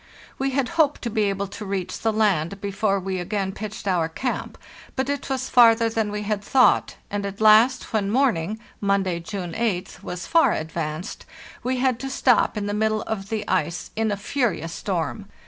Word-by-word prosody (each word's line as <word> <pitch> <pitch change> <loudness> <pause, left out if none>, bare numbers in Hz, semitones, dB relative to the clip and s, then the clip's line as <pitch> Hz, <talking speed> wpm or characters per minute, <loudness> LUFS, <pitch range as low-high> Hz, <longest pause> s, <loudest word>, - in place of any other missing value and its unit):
We 270 +1 +1
had 265 -1 0
hoped 295 -2 +3
to 235 - -2
be 215 -1 +1
able 200 0 -1
to 200 +2 -8
reach 190 -2 -3
the 225 - +1
land 200 -4 +1
before 200 0 0
we 190 0 -3
again 190 +1 -2
pitched 210 +1 -7
our 170 -4 +1
camp, 250 +10 -3 0.4
but 265 +1 -1
it 285 0 -3
was 260 -1 -1
farther 230 -2 +6
than 220 -2 -1
we 210 0 -3
had 210 -1 -2
thought, 255 +3 +3 0.2
and 205 0 -2
at 200 0 -5
last, 220 +4 +5
when 205 -3 +1
morning 220 -6 +1 0.2
(Monday, 195 -3 +1
June 175 0 -5
8th) 195 -4 -2
was 180 0 -6
far 325 -8 +4
advanced, 160 +1 -4 0.3
we 255 +1 -1
had 255 -2 +1
to 270 - -4
stop 250 -4 +2
in 205 - -2
the 205 - -2
middle 215 0 +1
of 200 -2 -4
the 220 -2 -3
ice 175 -2 -1
in 220 -1 0
a 205 - -1
furious 200 - -1
storm. 195 +3 -3
210 Hz, 190 wpm, -24 LUFS, 190-230 Hz, 0.4 s, farther